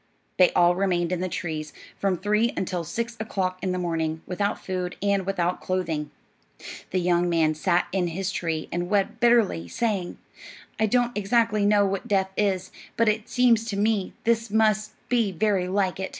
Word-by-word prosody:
They 180 - +7
all 175 0 +5
remained 175 -2 0
in 180 - -1
the 185 - -1
trees 155 -3 -4 0.2
from 195 -2 0
three 210 +6 +1
until 180 -2 -2
six 235 +8 -4
o'clock 185 -4 -2
in 190 - -1
the 185 - -1
morning, 160 -2 -2
without 200 +3 -1
food 180 -1 -4
and 200 -2 0
without 180 -2 -1
clothing. 165 -5 -2 0.8
The 185 - -1
young 175 0 +2
man 160 -2 +2
sat 170 +3 +1
in 185 -2 0
his 190 +3 -3
tree 165 -4 -2
and 175 +1 -2
wept 205 +2 0
bitterly, 230 - +3
saying, 200 - -2 0.6
"I 220 - +3
don't 245 +2 +1
exactly 210 0 +2
know 205 -1 +4
what 195 -1 -2
death 190 -2 +1
is, 190 -3 0 0.3
but 230 -1 +4
it 215 +1 -2
seems 240 -3 +3
to 215 -3 -3
me 210 -2 0
this 230 -1 +1
must 215 0 +2
be 230 -5 +1
very 190 0 +1
like 190 -1 0
it." 190 - -3
190 Hz, 180 wpm, -25 LUFS, 175-215 Hz, 0.8 s, They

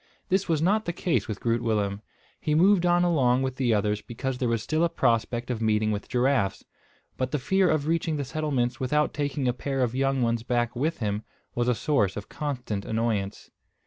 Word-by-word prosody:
This 190 0 +1
was 160 -2 +2
not 210 +5 +2
the 175 - -2
case 150 - 0
with 105 -2 -4
Groot 115 0 0
Willem. 105 -3 -1 0.4
He 150 - 0
moved 180 +2 +4
on 175 0 +4
along 135 -7 +3
with 130 -1 -3
the 125 -3 +1
others 105 0 +1
because 125 +2 -4
there 125 - 0
was 115 -2 0
still 155 +2 0
a 170 - +3
prospect 120 -1 0
of 115 -2 -3
meeting 110 -1 +2
with 105 -1 -4
giraffes; 125 -5 +1 0.5
but 130 -1 -1
the 150 - -1
fear 190 +7 +2
of 155 -2 +1
reaching 165 -1 0
the 140 - -2
settlements 135 -4 -1
without 150 +4 +1
taking 145 -2 -1
a 125 - +2
pair 135 +1 -2
of 120 -1 -1
young 135 0 +1
ones 115 -1 +1
back 120 0 -1
with 150 +4 -1
him 105 -1 -1 0.3
was 120 0 0
a 125 - +3
source 110 -9 +1
of 100 - -7
constant 125 -9 -3
annoyance. 110 -3 -2
125 Hz, 210 wpm, -26 LUFS, 115-150 Hz, 0.5 s, moved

